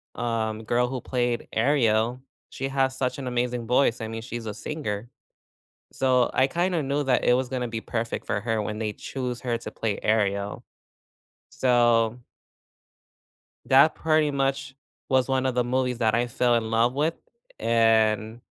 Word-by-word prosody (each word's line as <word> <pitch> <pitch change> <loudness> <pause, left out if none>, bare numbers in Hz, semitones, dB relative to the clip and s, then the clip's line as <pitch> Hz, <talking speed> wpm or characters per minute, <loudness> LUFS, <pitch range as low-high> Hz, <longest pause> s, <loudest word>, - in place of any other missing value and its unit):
um, 110 -2 -2
girl 120 +2 +1
who 130 0 -4
played 120 -2 -1
Ariel, 115 -1 +2 0.3
she 135 - -4
has 135 -1 0
such 130 +2 -1
an 130 - -5
amazing 125 -1 -2
voice. 125 -1 +2
I 110 - -3
mean, 115 0 -5
she's 120 -1 -6
a 105 - -3
singer. 115 -4 -5 0.8
So 130 -2 +2
I 130 - +3
kinda 175 +2 0
knew 140 +2 -1
that 130 -2 +1
it - - +4
was 130 0 -1
gonna 125 -2 -2
be 115 -1 -4
perfect 115 0 -3
for 100 - -1
her 110 -1 -1
when 105 +1 -4
they 110 -1 -2
choose 125 -1 -5
her 120 -2 -1
to - - -8
play 110 -3 -3
Ariel. 100 -2 0 0.9
So 120 -2 +2 1.5
That 135 +4 +6
pretty 155 -1 +2
much 135 -1 -1 0.3
was 130 -1 +2
one 130 -1 +1
of 130 - 0
the 125 0 +1
movies 125 0 -1
that 110 -2 +2
I 120 +1 +2
fell 120 0 +2
in 115 -1 0
love 115 +2 +2
with, 155 +4 +1 0.4
and 110 -1 +2
120 Hz, 165 wpm, -25 LUFS, 115-130 Hz, 1.5 s, That